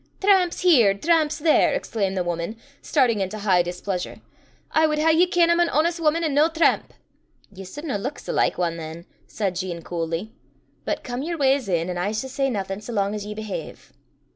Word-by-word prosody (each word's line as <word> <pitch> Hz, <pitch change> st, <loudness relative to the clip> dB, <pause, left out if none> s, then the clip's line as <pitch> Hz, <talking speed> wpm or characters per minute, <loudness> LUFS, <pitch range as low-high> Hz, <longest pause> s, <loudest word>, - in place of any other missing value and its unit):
"Tramps 385 Hz, -3 st, +3 dB
here, 245 Hz, -, +5 dB
tramps 310 Hz, +4 st, +1 dB
there!" 315 Hz, 0 st, +3 dB
exclaimed 195 Hz, -4 st, -2 dB
the 180 Hz, -, +1 dB
woman, 170 Hz, +4 st, -3 dB, 0.3 s
starting 250 Hz, -7 st, +2 dB
into 195 Hz, +2 st, -3 dB
high 195 Hz, -4 st, +3 dB
displeasure; 180 Hz, +1 st, -4 dB, 0.5 s
"I 315 Hz, 0 st, +4 dB
wad 305 Hz, -1 st, -1 dB
hae 320 Hz, +2 st, +3 dB
ye 340 Hz, +3 st, +4 dB
ken 345 Hz, -1 st, +3 dB
I'm 340 Hz, -, +3 dB
an 345 Hz, -1 st, +3 dB
honest 335 Hz, +3 st, +1 dB
wuman, 325 Hz, +1 st, +1 dB
an' 310 Hz, -3 st, 0 dB
no 300 Hz, +3 st, +4 dB
tramp!" 330 Hz, 0 st, +1 dB, 0.6 s
"Ye 195 Hz, 0 st, -9 dB
sudna 275 Hz, -, -4 dB
luik 265 Hz, +8 st, -4 dB
sae -, -, -6 dB
like -, -, +1 dB
ane 170 Hz, -2 st, -1 dB
than," 165 Hz, +1 st, -8 dB, 0.2 s
said 195 Hz, -4 st, -2 dB
Jean 175 Hz, -3 st, -4 dB
coolly. 170 Hz, +4 st, -4 dB, 0.5 s
"But -, -, -2 dB
come 245 Hz, +1 st, -4 dB
yer 335 Hz, +3 st, -3 dB
wa's 270 Hz, -5 st, +2 dB
in, 170 Hz, -2 st, 0 dB
an' 180 Hz, -1 st, -3 dB
I 190 Hz, +3 st, 0 dB
s' 220 Hz, +5 st, -4 dB
say 270 Hz, +1 st, 0 dB
naething 195 Hz, -3 st, -3 dB
sae 215 Hz, -, -8 dB
lang 200 Hz, -1 st, 0 dB
as 210 Hz, -1 st, -5 dB
ye 210 Hz, -, -6 dB
behave." 215 Hz, -1 st, -7 dB
220 Hz, 200 wpm, -23 LUFS, 190-310 Hz, 0.6 s, here